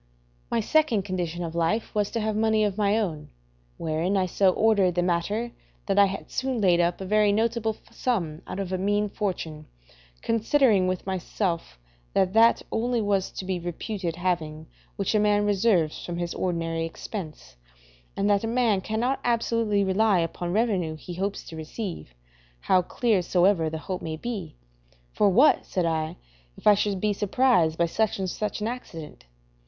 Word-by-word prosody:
My 230 - +1
second 240 -5 +2
condition 175 -3 -3
of 165 -1 -5
life 170 +7 0
was 210 -1 0
to 230 - -2
have 215 0 -1
money 220 0 +2
of 205 -2 0
my 205 0 +2
own, 165 -9 -3 0.5
wherein 165 +5 -1
I 190 - +2
so 190 +2 +3
ordered 200 -3 +3
the 175 - +2
matter 200 +7 -1 0.3
that 195 0 +2
I 200 - +7
had 195 +1 -6
soon 260 -2 -1
laid 180 -4 +4
up 175 0 +1
a - - -4
very 210 +1 +3
notable 225 0 0
sum 170 -11 -2
out 190 - -5
of 190 -1 -3
a 185 - -1
mean 205 +2 +1
fortune, 160 -7 -4 0.6
considering 225 -3 +3
with 185 -1 -2
myself 180 - -3 0.4
that 190 -1 +2
that 225 +1 +5
only 240 +1 0
was 200 -3 0
to 190 - -6
be 185 -1 -2
reputed 175 +1 -4
having 165 -3 -2 0.3
which 200 +1 -1
a 215 - +3
man 205 0 +3
reserves 195 -6 +1
from 175 -1 -5
his 175 -1 -3
ordinary 165 -2 -2
expense, 165 - -7 0.6
and 200 - +1
that 205 0 +3
a - - -1
man 230 -4 +2
cannot 230 +7 -1
absolutely 230 -3 +1
rely 195 +1 +3
upon 175 +1 -2
revenue 190 -7 0
he 175 +3 -9
hopes 195 +3 -3
to 165 - -10
receive, 160 - -6 0.5
how 185 - +3
clear 215 +2 +1
soever 175 -2 +2
the 160 - -4
hope 180 +4 -5
may 160 -1 -4
be. 215 - -5 0.6
For 205 - +3
what, 255 +11 +5
said 180 -2 -1
I, 160 -1 -1 0.4
if - - -15
I 210 - +8
should 200 -1 0
be 210 +1 +1
surprised 205 -6 +2
by 170 - +3
such 215 +5 0
or 190 - -1
such 210 +3 -3
an 215 - -1
accident? 165 - -8
195 Hz, 175 wpm, -26 LUFS, 175-215 Hz, 0.6 s, I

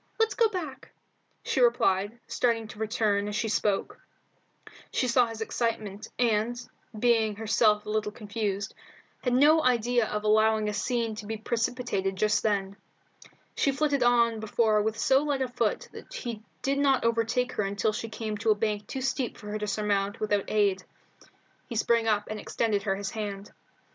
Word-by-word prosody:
Let's 445 0 +2
go 460 -2 +3
back," 310 -10 -6 0.5
she - - -1
replied, 210 -3 +2
starting 230 -3 0
to 215 - -11
return 215 -2 0
as 210 - -4
she 220 - -1
spoke. 205 -2 0 0.9
She 255 - 0
saw 245 0 +4
his 225 -1 -7
excitement, 220 -3 -2
and, 235 0 +1 0.4
being 225 -2 +2
herself 215 0 +2
a - - -7
little 215 -1 -1
confused, 205 -2 -3 0.5
had 250 - +1
no 305 +4 +5
idea 240 -2 +2
of 210 0 -3
allowing 215 0 +3
a 210 - -1
scene 230 +2 -1
to 210 - -7
be 220 0 -3
precipitated 225 -3 -1
just 210 +2 +2
then. 200 -2 -1 0.8
She 280 - +2
flitted 285 0 0
on 235 -2 +3
before 215 0 +2
with 220 +1 -1
so 265 +4 +3
light 285 -3 0
a - - -2
foot 235 -3 -1
that - - -12
he 240 - -5 0.2
did 275 +1 +1
not 270 -4 +3
overtake 230 +2 +1
her 210 - -1
until 200 +2 0
she 225 +1 -4
came 220 -1 -4
to 225 +1 0
a 215 - +5
bank 210 -1 -2
too 265 - -4
steep 260 -1 -2
for 210 - -9
her 215 - -3
to 210 - -3
surmount 205 0 -1
without 205 -2 0
aid. 200 -3 +2 0.9
He 235 - -5
sprang 230 +1 +2
up 210 -1 +1
and 215 0 -5
extended 210 -1 -1
her 195 -1 0
his 195 0 -4
hand. 205 -2 -5
220 Hz, 175 wpm, -28 LUFS, 210-240 Hz, 0.9 s, no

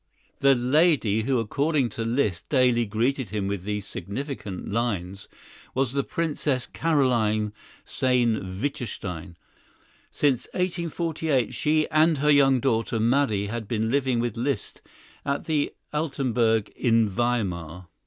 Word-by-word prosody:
The 140 -1 +5
lady 125 - +3
who 130 +2 +1
according 140 +4 0
to 115 +2 -4
Liszt 115 -6 -1
daily 125 -4 +3
greeted 120 +3 0
him 105 -1 -2
with 100 -2 -2
these 105 +1 -3
significant 105 - -6
lines 100 -4 -2 0.5
was 130 -1 +1
the 140 0 +1
Princess 150 -6 -1
Carolyne 115 -9 +1 0.3
Sayn 115 -7 0
Wittgenstein. 100 - -4 0.7
Since 135 -5 +1
1848 165 - -1
she 155 +1 +1
and 155 +1 +4
her 150 +2 +3
young 135 -2 +5
daughter 115 -2 0
Marie 115 -3 +2
had 110 +1 -4
been 110 0 -1
living 130 -3 +1
with 120 -2 -1
Liszt 130 +4 -3 0.4
at 140 0 -2
the 150 -3 0 0.2
Altenburg 125 -8 +1
in 115 -3 +2
Weimar. 95 -6 -2
120 Hz, 125 wpm, -25 LUFS, 105-140 Hz, 0.7 s, The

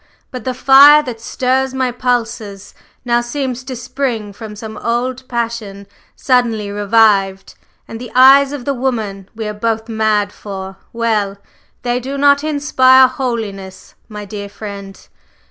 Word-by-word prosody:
But 255 -4 -8
the 255 -1 -2
fire 280 +3 +7
that 240 -5 -7
stirs 260 +2 -1
my 260 -1 0
pulses 230 -5 -3 0.3
now 240 0 +2
seems 255 0 -4
to 260 - -6
spring 245 -4 -4
from 215 0 -9
some 220 +1 -8
old 250 +2 -3
passion 230 -4 -4 0.3
suddenly 230 -5 0
revived, 200 -2 +2 0.3
and 225 +1 -8
the 245 - -8
eyes 270 +2 +7
of 285 -4 -6
the 280 - 0
woman 220 -7 -3
we 220 -1 -5
are 210 - -4
both 225 +1 -2
mad 215 -2 0
for 190 -1 -8
well! 215 -4 -1 0.5
they 245 0 0
do 270 +3 -5
not 285 +1 +3
inspire 265 -4 +4
holiness, 220 -7 -5 0.2
my 210 -1 -8
dear 200 0 -7
friend! 200 -1 -9
235 Hz, 145 wpm, -16 LUFS, 210-255 Hz, 0.5 s, fire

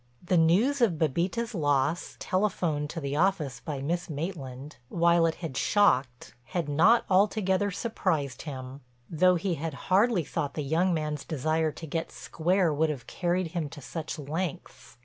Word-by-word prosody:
The 180 +1 +1
news 195 +13 +3
of 225 -7 +4
Bébita's 175 - -1
loss, 145 -1 0
telephoned 175 -7 -1
to 165 - -5
the 140 -2 -3
office 155 -8 +1
by 135 +2 -5
Miss 170 +4 -2
Maitland, 145 -3 -6
while 170 0 +3
it 160 - -1
had 140 -5 -6
shocked, 130 -11 +2
had 165 +4 -3
not 170 +11 +4
altogether 200 0 +2
surprised 180 - -2
him, 135 -2 -7 0.3
though 180 +3 +4
he 180 +1 -1
had 160 -2 -4 0.2
hardly 200 -2 +4
thought 145 -1 -3
the 150 - -2
young 165 +6 +1
man's 150 -3 -2
desire 155 +1 0
to 165 - -8
get 160 +2 -3
square 175 0 0
would 155 +2 +1
have 140 -6 -5
carried 175 -1 -1
him 165 -3 -3
to 145 - -10
such 160 +4 -6
lengths. 160 0 -5
165 Hz, 160 wpm, -28 LUFS, 145-185 Hz, 0.3 s, of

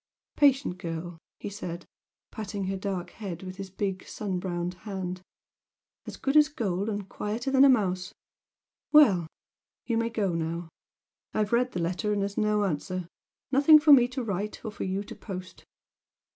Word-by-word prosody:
"Patient 270 -10 +3
girl!" 170 -1 -5 0.2
he 205 - -6
said, 175 -3 -6 0.5
patting 205 -2 -4
her 190 +1 -2
dark 190 -2 -4
head 190 -5 -7
with 185 0 -7
his 195 -1 -6
big 190 0 -3
sun 195 -4 -3
browned 175 -1 -3
hand 185 -3 -5 0.9
"As - - -7
good 275 +1 -1
as 300 0 +7
gold 205 - -2
and 205 -2 -3
quieter 225 +8 -3
than 270 0 +6
a 280 - +8
mouse! 185 -7 +1 0.8
Well! 205 - +6 0.6
You 230 -2 +1
may 230 0 0
go 210 -6 -1
now. 165 +1 -3 0.7
I've 215 +1 0
read 250 +2 +2
the 180 - -2
letter 185 +5 -1
and 205 -1 +1
there's 200 0 -3
no 210 -1 +2
answer. 185 0 -2 0.4
Nothing 285 +3 +8
for 300 -1 +7
me 245 -3 +7
to 255 0 -4
write, 210 +1 -4
or 220 - -3
for 210 - -5
you 190 +2 -2
to - - -9
post!" 185 -3 -8
200 Hz, 170 wpm, -28 LUFS, 185-230 Hz, 0.9 s, a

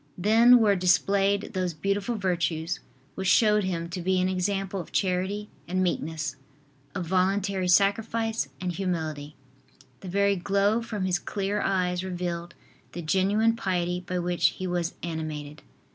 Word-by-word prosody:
Then 225 +6 +6
were 210 -4 +4
displayed 195 +2 +2
those 180 -3 -2
beautiful 200 +7 -1
virtues 175 -4 -1 0.3
which 190 0 -3
showed 210 +2 +4
him 170 -2 -2
to 175 +1 -5
be 185 +1 +1
an 185 - +2
example 195 +1 -1
of 170 - -8
charity 190 +2 -1 0.2
and 185 +2 0
meekness, 160 -4 -2 0.6
of 180 -3 -2
voluntary 190 +1 +1
sacrifice 225 +4 +2
and 180 -1 -2
humility. 160 -5 -3 0.6
The 185 - -8
very 200 +1 +2
glow 200 +5 +1
from 215 -4 -3
his 180 -2 +1
clear 200 +1 -2
eyes 180 -2 0
revealed 175 -2 -4 0.4
the 175 - -5
genuine 200 +7 +2
piety 180 -5 -1
by 180 0 -4
which 175 0 +2
he 185 - -4
was 175 -2 -2
animated. 155 -3 -5
185 Hz, 145 wpm, -27 LUFS, 175-200 Hz, 0.6 s, Then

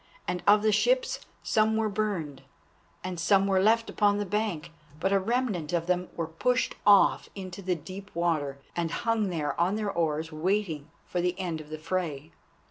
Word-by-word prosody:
And 180 - -2
of 205 +1 +6
the 215 - +4
ships, - - +2 0.2
some 220 0 +2
were 220 -1 +1
burned 200 -9 -2 0.6
and 185 -2 -4
some 195 +3 +4
were 190 -1 +3
left 225 +3 +3
upon 205 -1 +2
the 205 - -1
bank. 195 -5 -2 0.3
But 190 +4 +1
a 195 - +4
remnant 200 -7 -1
of 170 -1 +1
them 180 0 0
were 165 - -1
pushed 245 +11 0
off 200 -1 +5
into 185 -1 -7
the 185 -1 0
deep 190 +5 -9
water, 155 -5 0 0.2
and 170 -1 -1
hung 230 +1 0
there 155 -5 -1
on 185 +4 +2
their 210 -2 -1
oars 160 -2 -1
waiting 160 -2 -1 0.2
for 175 - -2
the 180 +1 -1
end 170 -4 -3
of 150 - -14
the 155 - -5
fray. 160 -2 -3
185 Hz, 185 wpm, -28 LUFS, 165-210 Hz, 0.6 s, of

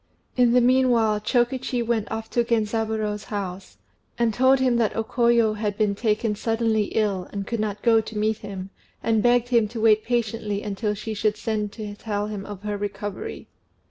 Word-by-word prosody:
In 245 -2 +4
the 250 - +5
meanwhile, 240 -4 +3
Chokichi 245 +2 0
went 225 -2 -1
off 220 0 -4
to 240 - +2
Genzaburô's 220 -2 -1
house, 195 -2 -6 0.4
and 235 -2 +1
told 260 +3 +4
him 255 -2 +2
that 225 -3 +1
O 225 - 0
Koyo 235 -2 +2
had 205 -2 -2
been 210 -2 +2
taken 215 +1 0
suddenly 225 0 0
ill, 200 -4 -1
and 200 -1 -4
could 230 +1 -3
not 210 -1 -3
go 225 -1 +5
to 220 0 -8
meet 215 +1 +1
him, 195 -2 -7 0.3
and 225 -1 +2
begged 245 +1 +3
him 235 -3 +3
to 225 +2 -7
wait 215 -1 +4
patiently 220 -3 -1
until 210 +1 -2
she 215 +2 -5
should 210 0 0
send 210 -2 -2
to 210 -2 -6
tell 205 0 -3
him 210 -2 -6
of 205 -1 -8
her 210 -1 -2
recovery. 205 0 -5
220 Hz, 185 wpm, -24 LUFS, 210-235 Hz, 0.4 s, the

